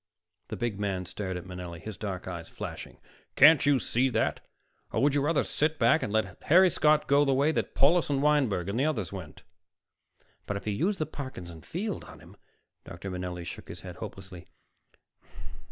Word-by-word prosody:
The -, -, -5 dB
big 120 Hz, -4 st, -3 dB
man 95 Hz, -3 st, -2 dB
stared 95 Hz, 0 st, -4 dB
at 90 Hz, -, -8 dB
Manelli, 90 Hz, -2 st, -7 dB
his 110 Hz, +4 st, -7 dB
dark 95 Hz, -2 st, -5 dB
eyes 85 Hz, -3 st, -6 dB
flashing. -, -, -7 dB, 0.4 s
"Can't 150 Hz, 0 st, +7 dB
you 145 Hz, -1 st, +5 dB
see 130 Hz, +1 st, +1 dB
that? 115 Hz, -2 st, 0 dB, 0.5 s
Or -, -, 0 dB
would 145 Hz, -1 st, +4 dB
you 145 Hz, -, +2 dB
rather 150 Hz, +2 st, +2 dB
sit 155 Hz, +1 st, 0 dB
back 160 Hz, -, +4 dB
and 105 Hz, -, -3 dB
let 110 Hz, 0 st, -1 dB
Harry 180 Hz, +3 st, +6 dB
Scott 150 Hz, 0 st, +3 dB
go 140 Hz, +1 st, +4 dB
the 135 Hz, -2 st, +2 dB
way 140 Hz, +4 st, +3 dB
that -, -, -2 dB
Paulus 165 Hz, +5 st, +4 dB
and 140 Hz, -2 st, +1 dB
Wineberg 135 Hz, -, +2 dB
and 100 Hz, +5 st, -2 dB
the 140 Hz, -, +2 dB
others 110 Hz, -, -2 dB
went?" 90 Hz, -6 st, -9 dB, 1.0 s
"But 100 Hz, 0 st, -3 dB
to 105 Hz, -, -2 dB
use 180 Hz, -, 0 dB
the 155 Hz, -, -1 dB
Parkinson 95 Hz, -, -8 dB
Field 200 Hz, -, -4 dB
on -, -, -13 dB
him -, -, -16 dB, 0.3 s
" -, -, -53 dB
Dr. 90 Hz, +3 st, -8 dB
Manelli 90 Hz, -1 st, -5 dB
shook 85 Hz, -, -8 dB
his -, -, -8 dB
head -, -, -9 dB
hopelessly. 95 Hz, -3 st, -9 dB
110 Hz, 190 wpm, -28 LUFS, 90-145 Hz, 1.0 s, Can't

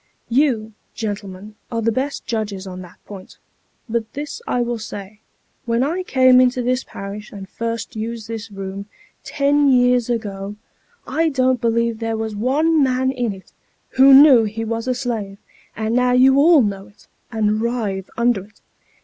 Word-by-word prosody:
You, 235 Hz, -4 st, +1 dB, 0.2 s
gentlemen, 205 Hz, -2 st, -6 dB, 0.2 s
are 230 Hz, -1 st, -2 dB
the 230 Hz, -, +2 dB
best 270 Hz, +5 st, -3 dB
judges 205 Hz, -4 st, -3 dB
on 185 Hz, -1 st, -8 dB
that 180 Hz, -2 st, -13 dB
point; 195 Hz, -2 st, -11 dB, 0.5 s
but 230 Hz, -1 st, -3 dB
this 295 Hz, -, -6 dB
I 245 Hz, -, 0 dB
will 240 Hz, -1 st, -2 dB
say, 210 Hz, -1 st, -8 dB, 0.5 s
when 230 Hz, +2 st, +1 dB
I 330 Hz, +7 st, -1 dB
came 255 Hz, -6 st, +5 dB
into 250 Hz, 0 st, +1 dB
this 255 Hz, +1 st, 0 dB
parish, 205 Hz, +2 st, -8 dB
and 195 Hz, -2 st, -9 dB
first 230 Hz, +2 st, -5 dB
used 225 Hz, 0 st, -5 dB
this 225 Hz, -1 st, -6 dB
room, 195 Hz, 0 st, -7 dB, 0.4 s
ten 285 Hz, 0 st, +2 dB
years 245 Hz, -2 st, +3 dB
ago, 205 Hz, -4 st, -4 dB, 0.5 s
I 325 Hz, 0 st, 0 dB
don't 260 Hz, -3 st, +1 dB
believe 230 Hz, -1 st, 0 dB
there 225 Hz, -1 st, -2 dB
was 220 Hz, -1 st, -4 dB
one 295 Hz, +8 st, +2 dB
man 260 Hz, -1 st, +1 dB
in 245 Hz, -4 st, -2 dB
it, 190 Hz, -1 st, -12 dB, 0.4 s
who 270 Hz, +1 st, +6 dB
knew 270 Hz, -3 st, +8 dB
he 220 Hz, +2 st, -4 dB
was 230 Hz, +2 st, -3 dB
a 255 Hz, -, 0 dB
slave 225 Hz, -6 st, -4 dB, 0.4 s
and 220 Hz, +1 st, -2 dB
now 250 Hz, 0 st, +2 dB
you 265 Hz, +2 st, +5 dB
all 310 Hz, -2 st, +6 dB
know 195 Hz, -2 st, -3 dB
it, 205 Hz, 0 st, -22 dB, 0.3 s
and 215 Hz, -1 st, 0 dB
writhe 220 Hz, -5 st, -2 dB
under 235 Hz, -5 st, +1 dB
it. 215 Hz, -, -25 dB
230 Hz, 165 wpm, -20 LUFS, 210-255 Hz, 0.5 s, knew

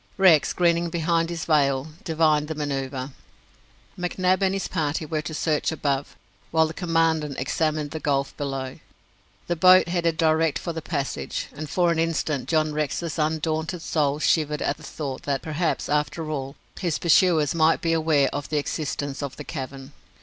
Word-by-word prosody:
Rex, 180 Hz, -6 st, +5 dB
grinning 170 Hz, -1 st, +2 dB
behind 165 Hz, 0 st, 0 dB
his 170 Hz, -1 st, -4 dB
veil, 140 Hz, -2 st, +2 dB
divined 155 Hz, -2 st, +2 dB
the 160 Hz, -, -4 dB
manoeuvre. 135 Hz, -2 st, -3 dB, 0.9 s
McNab 185 Hz, +1 st, +1 dB
and 190 Hz, -1 st, +3 dB
his 195 Hz, -, -2 dB
party 155 Hz, -2 st, -1 dB
were 155 Hz, 0 st, -2 dB
to 155 Hz, -, -6 dB
search 155 Hz, 0 st, 0 dB
above, 145 Hz, -3 st, -2 dB, 0.3 s
while 160 Hz, 0 st, +3 dB
the 160 Hz, -, -5 dB
Commandant 165 Hz, -4 st, 0 dB
examined 150 Hz, +2 st, -1 dB
the 160 Hz, -, -4 dB
gulf 140 Hz, -2 st, -1 dB
below. 135 Hz, -2 st, -4 dB, 0.7 s
The 175 Hz, -, -1 dB
boat 185 Hz, +1 st, +6 dB
headed 170 Hz, -2 st, 0 dB
direct 160 Hz, -1 st, +2 dB
for 170 Hz, -, -4 dB
the 160 Hz, -, -5 dB
passage, 145 Hz, -3 st, -3 dB
and 150 Hz, +1 st, -7 dB
for 175 Hz, -2 st, +2 dB
an 165 Hz, -, 0 dB
instant 160 Hz, -4 st, -1 dB
John 155 Hz, -2 st, +2 dB
Rex's 155 Hz, +2 st, -2 dB
undaunted 160 Hz, +2 st, -1 dB
soul 145 Hz, -2 st, +1 dB
shivered 150 Hz, -1 st, +1 dB
at -, -, -1 dB
the -, -, -17 dB
thought 140 Hz, -4 st, -5 dB
that, 140 Hz, -2 st, 0 dB
perhaps, 160 Hz, +2 st, -1 dB
after 150 Hz, +2 st, -1 dB
all, 135 Hz, -1 st, -4 dB, 0.2 s
his 170 Hz, -5 st, 0 dB
pursuers 165 Hz, -4 st, +4 dB
might 165 Hz, 0 st, +3 dB
be 165 Hz, -1 st, 0 dB
aware 155 Hz, -4 st, +3 dB
of 145 Hz, 0 st, -4 dB
the 155 Hz, -, 0 dB
existence 145 Hz, -1 st, -3 dB
of 140 Hz, -2 st, -4 dB
the 150 Hz, -, -6 dB
cavern. 135 Hz, -2 st, -7 dB
155 Hz, 170 wpm, -24 LUFS, 145-165 Hz, 0.9 s, boat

